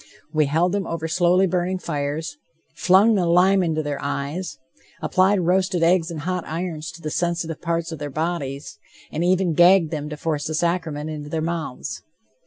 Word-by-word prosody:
We 155 -2 +3
held 165 +5 +2
them 200 -2 -1
over 165 -1 -3
slowly 180 +3 +3
burning 180 +1 0
fires, 150 - -3 0.4
flung 195 +5 +5
lime 185 +1 +4
into 160 -3 0
their 145 -1 -3
eyes, 145 +6 -3 0.4
applied 190 +1 +2
roasted 180 0 +1
eggs 170 0 +3
and 160 -3 -5
hot 180 +1 -2
irons 165 -1 -4
to 165 0 -13
the 155 - -3
sensitive 170 -2 -2
parts 170 0 -2
of 160 - -6
their 145 0 -4
bodies, 145 - -4 0.3
and 160 - -2
even 180 -1 +2
gagged 175 0 +5
them 150 -2 -4
to 150 - -6
force 150 -1 -2
the 155 - -2
sacrament 160 -3 -1
into 150 -1 -6
their 160 - -2
mouths..... 165 -6 -4
165 Hz, 175 wpm, -23 LUFS, 155-180 Hz, 0.4 s, flung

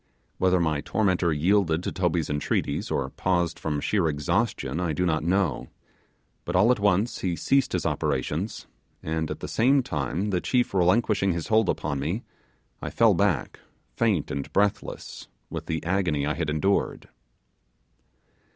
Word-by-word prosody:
Whether 95 -1 +3
my 80 -3 0
tormentor 95 -4 +1
yielded 85 +1 +2
to - - -2
Toby's 85 -3 0
entreaties, 75 -1 -1
or - - -1
paused 85 -2 0
from 75 -2 -2
sheer 95 +1 +1
exhaustion, 75 -1 -1
I 85 -3 -1
do 90 +5 0
not 80 -3 0
know; 90 -3 0 0.8
but 85 - -4
all 105 +7 +5
at 125 - +1
once 100 +3 +1
he 90 -3 -1
ceased 135 +9 +1
his - - -1
operations, 90 +9 -2 0.4
and 80 0 -2
at - - -5
the - - -4
same 130 +4 +3
time 80 - -2
the 90 -2 0
chief 125 -4 +1
relinquishing 95 +1 +2
his 85 -1 -4
hold 110 -3 +3
upon 70 - -1
me, 85 - -2 0.6
I - - -4
fell - - +4
back, - - 0 0.4
faint 100 -10 +1
and 70 0 -4
breathless 100 0 -1 0.2
with - - -5
the 80 -1 -3
agony 85 -6 0
I 75 - 0
had 75 - -2
endured. 85 +6 0
90 Hz, 155 wpm, -26 LUFS, 80-100 Hz, 0.8 s, all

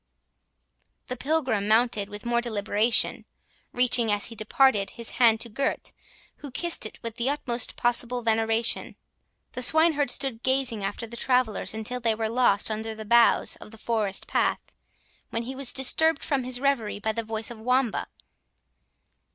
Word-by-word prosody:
The 250 - -3
Pilgrim 255 -7 -1
mounted 215 -2 +2
with 205 +2 -9
more 235 0 +1
deliberation, 220 0 0 0.5
reaching, 245 -2 +2
as 205 0 0
he 230 - -6
departed, 215 -1 +2
his 235 -1 -3
hand 225 -2 +5
to - - -2
Gurth, 270 +6 -3 0.5
who 285 - -9
kissed 335 -2 0
it - - -15
with 230 -1 -5
the 240 +2 0
utmost 245 -5 -1
possible 245 0 -1
veneration. 225 0 0 0.6
The 250 - -6
swineherd 310 +1 +4
stood 250 -2 -1
gazing 260 -5 0
after 205 +4 -4
the 235 +1 -9
travellers 250 -4 0
until 220 +3 -3
they 230 -2 0
were 220 0 -2
lost 225 -3 +2
under 220 +1 -4
the 220 0 -8
boughs 235 +2 +4
of - - -12
the 225 - -14
forest 215 -3 -2
path, - - -1 0.6
when 230 - -3
he 255 +3 -6
was 270 -1 +3
disturbed 285 +3 +2
from 270 -3 -1
his 250 -1 +1
reverie 265 -7 0
by 220 +2 -1
the 230 +1 -3
voice 225 +1 -4
of 235 - -10
Wamba. 250 +1 0
235 Hz, 160 wpm, -25 LUFS, 220-255 Hz, 0.6 s, hand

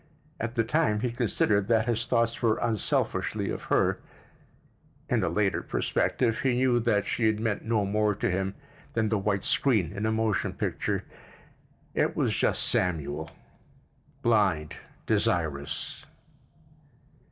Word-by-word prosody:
At 115 +2 -3
the 115 - +2
time 115 -4 +1
he 125 - -1
considered 105 -4 +1
that 110 -1 +3
his 115 -1 -1
thoughts 115 0 +1
were 115 -3 +2
unselfishly 115 -4 0
of - - -5
her; - - +2 1.1
in 115 -4 +1
a 90 - +1
later 100 +3 +1
perspective 115 -3 0
he 130 -3 +1
knew 125 -1 +3
that 110 -3 +1
she 115 - 0
had 110 -1 +1
meant 110 -2 -2
no 110 -3 +1
more 105 +1 +1
than 95 -3 -1 0.4
the 110 -2 +1
white 100 -1 -1
screen 105 - +2
in 100 +2 -2
a - - +1
motion 110 -4 0
picture: - - -2 0.9
it - - +1
was - - +1
just - - +2
Samuel—blind, 80 +3 -2 0.3
desirous. 75 -4 -1
110 Hz, 130 wpm, -27 LUFS, 95-115 Hz, 1.1 s, that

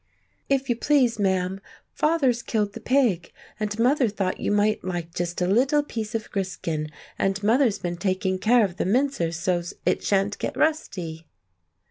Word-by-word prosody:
"If 270 -1 +1
you 240 - +1
please, 245 -3 +2
ma'am, 190 -1 0 0.3
father's 275 -7 +2
killed 210 -4 -1
the - - -7
pig, 230 -8 +1 0.3
and 210 0 -2
mother 250 +1 +3
thought 195 -2 -2
you - - -1
might 210 +1 +2
like 175 -2 -4
just 175 0 -2
a - - +2
little 260 +10 +3
piece 225 -5 -5
of 220 -1 -4
griskin, 170 -6 -3 0.3
and 195 +1 0
mother's 230 0 +3
been 175 -1 -4
taking 185 +1 -1
care 230 +2 +4
of 185 -2 -6
the - - -1
mincer 235 -5 +1
so's 175 +1 -2
it - - +1
shan't 200 +1 +1
get - - -3
rusty." 180 - -1
205 Hz, 165 wpm, -25 LUFS, 185-245 Hz, 0.3 s, care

